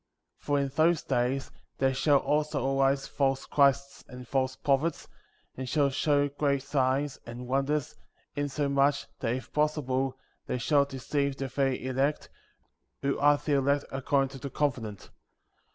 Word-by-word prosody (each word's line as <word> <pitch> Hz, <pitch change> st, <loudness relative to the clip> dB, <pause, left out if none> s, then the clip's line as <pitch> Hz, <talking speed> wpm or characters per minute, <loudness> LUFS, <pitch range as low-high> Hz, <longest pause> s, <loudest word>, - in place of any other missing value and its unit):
For 145 Hz, -1 st, 0 dB
in 140 Hz, -1 st, 0 dB
those 160 Hz, +4 st, +2 dB
days 125 Hz, +3 st, -1 dB, 0.3 s
there 135 Hz, 0 st, +2 dB
shall 140 Hz, +2 st, +4 dB
also 145 Hz, -2 st, 0 dB
arise 135 Hz, 0 st, +2 dB
false 135 Hz, -1 st, 0 dB
Christs, 140 Hz, -1 st, +2 dB
and 125 Hz, -1 st, -10 dB
false 130 Hz, -1 st, 0 dB
prophets, 140 Hz, +4 st, 0 dB, 0.5 s
and 130 Hz, -1 st, -5 dB
shall 140 Hz, -1 st, +2 dB
show 145 Hz, +1 st, +2 dB
great 140 Hz, -1 st, 0 dB
signs 135 Hz, 0 st, 0 dB
and 120 Hz, +1 st, -7 dB
wonders, 135 Hz, +2 st, 0 dB, 0.4 s
insomuch, 140 Hz, 0 st, +1 dB
that, 115 Hz, -1 st, 0 dB
if 130 Hz, -, -8 dB
possible, 135 Hz, -3 st, 0 dB, 0.3 s
they -, -, -1 dB
shall 140 Hz, +3 st, +3 dB
deceive 140 Hz, +1 st, -2 dB
the 135 Hz, -1 st, -3 dB
very 135 Hz, -1 st, -1 dB
elect, 135 Hz, +3 st, -1 dB, 0.7 s
who 140 Hz, 0 st, 0 dB
are 145 Hz, +1 st, +5 dB
the 145 Hz, +1 st, -2 dB
elect 140 Hz, +1 st, +1 dB
accord 135 Hz, +1 st, +1 dB
ing 135 Hz, -, -3 dB
to 135 Hz, -, -9 dB
the 140 Hz, -, -5 dB
covenant. 120 Hz, -8 st, -3 dB
140 Hz, 150 wpm, -29 LUFS, 130-145 Hz, 0.7 s, are